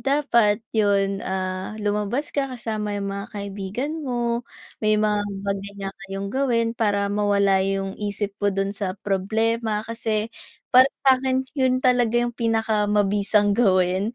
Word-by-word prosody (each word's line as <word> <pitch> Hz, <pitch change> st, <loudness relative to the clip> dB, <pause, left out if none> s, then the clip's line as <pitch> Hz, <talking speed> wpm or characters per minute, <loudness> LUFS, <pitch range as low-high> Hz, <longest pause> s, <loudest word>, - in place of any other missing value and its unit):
dapat 235 Hz, -7 st, +2 dB
yon, 200 Hz, -2 st, +2 dB
ah, 185 Hz, +2 st, -3 dB
lumabas 210 Hz, +7 st, -1 dB
ka 275 Hz, -1 st, 0 dB
kasama 215 Hz, -4 st, -3 dB
yung 200 Hz, 0 st, -3 dB
mga 200 Hz, 0 st, -5 dB
kaibigan 200 Hz, +6 st, -4 dB, 0.2 s
mo, 240 Hz, -1 st, 0 dB, 0.4 s
may 215 Hz, 0 st, +3 dB
mga 210 Hz, -1 st, +2 dB, 0.2 s
bagay 200 Hz, 0 st, -3 dB
na 195 Hz, -1 st, -4 dB, 0.2 s
kayong 195 Hz, 0 st, -4 dB
gawin 240 Hz, -4 st, +1 dB
para 205 Hz, -3 st, 0 dB
mawala 200 Hz, -1 st, +3 dB
yong 195 Hz, 0 st, -1 dB
isip 205 Hz, 0 st, -2 dB
mo 205 Hz, -, +2 dB
don 195 Hz, 0 st, -1 dB
sa 195 Hz, -1 st, -4 dB
problema. 220 Hz, +2 st, 0 dB
Kasi 225 Hz, -1 st, -2 dB, 0.4 s
para 255 Hz, +2 st, +8 dB, 0.2 s
sa 260 Hz, -1 st, +5 dB
akin 260 Hz, 0 st, 0 dB
yun 260 Hz, -3 st, +2 dB
talaga 245 Hz, -2 st, +3 dB
yung 240 Hz, -, -3 dB
pinakamabisang 210 Hz, -3 st, +1 dB
gawin 190 Hz, 0 st, +2 dB
210 Hz, 140 wpm, -23 LUFS, 200-235 Hz, 0.4 s, para